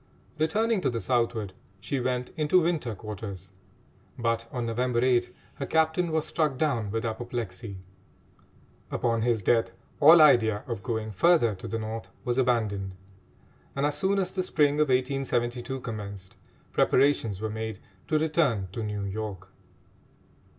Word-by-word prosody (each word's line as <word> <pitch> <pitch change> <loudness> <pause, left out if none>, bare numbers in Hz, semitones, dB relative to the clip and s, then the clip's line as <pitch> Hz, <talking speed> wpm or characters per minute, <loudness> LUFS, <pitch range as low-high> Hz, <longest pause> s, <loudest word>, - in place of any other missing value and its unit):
Returning 210 +7 +1
to - - +1
the 120 -2 -2
southward, 115 -2 0 0.3
she 135 +7 -2
went 125 0 -2
into 160 +3 +3
winter 155 -10 -1
quarters; 100 -2 -7 0.7
but 115 -1 -1
on 120 -2 -3
November 120 +1 0
8 120 -1 +2 0.3
her 140 - -4
captain 160 +2 +2
was 155 -1 0
struck 150 -5 0
down 125 -8 0
with 115 +2 -2
apoplexy. 115 -3 -4 1.1
Upon 115 -1 0
his 115 -3 +1
death 115 +1 +3 0.3
all 160 +3 +9
idea 110 -8 +5
of 115 -5 -4
going 110 -2 -3
further 120 - +4
to 95 - -8
the 115 - -2
North 110 0 -5 0.2
was 120 +1 0
abandoned, 105 -7 0 0.8
and, 140 +1 +1
as 145 - 0
soon 195 +1 +1
as 190 -2 -1
the 190 - 0
spring 150 -5 +2
of 150 -2 +3
1872 130 -1 0
commenced, 100 -5 -7 0.4
preparations 130 -7 +2
were 110 0 -3
made 110 -1 -4 0.3
to 155 - +2
return 150 - +1
to 115 - -5
New 105 -2 -3
York. 100 -1 -5
120 Hz, 145 wpm, -27 LUFS, 110-145 Hz, 1.1 s, all